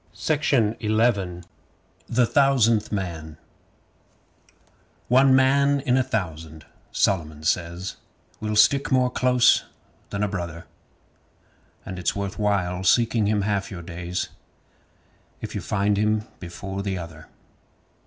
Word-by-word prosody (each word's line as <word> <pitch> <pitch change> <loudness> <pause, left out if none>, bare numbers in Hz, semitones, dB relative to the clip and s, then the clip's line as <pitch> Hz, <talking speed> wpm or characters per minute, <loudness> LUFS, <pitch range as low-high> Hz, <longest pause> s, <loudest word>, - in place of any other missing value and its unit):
SIMPLE 120 - +1
SIMON 100 -6 +1 0.6
The 120 +1 +2
Thousandth 115 -5 +3
Man 80 -6 -4 1.7
One 130 +2 +5
man 140 +2 +3
in 130 -3 +1
a 130 - +4
thousand, 80 -8 -4 0.3
Solomon 80 -5 0
says, 85 +3 -2 0.4
Will 105 0 -3
stick 140 +7 +4
more 125 -1 +3
close 125 -1 +3 0.5
than 100 +1 -2
a - - +1
brother. 85 -4 -5 1.2
And 95 -1 -6
it's 90 - -1
worth 100 0 -4
while 95 -3 0
seeking 115 +2 +3
him 105 -1 +1
half 100 -1 -1
your 85 -3 -8
days 90 +1 -4 1.1
If - - -7
you - - -3
find 100 0 0
him 105 +1 +1 0.2
before 95 +2 -6
the 100 -1 -3
other. 85 -3 -9
100 Hz, 115 wpm, -24 LUFS, 90-120 Hz, 1.7 s, One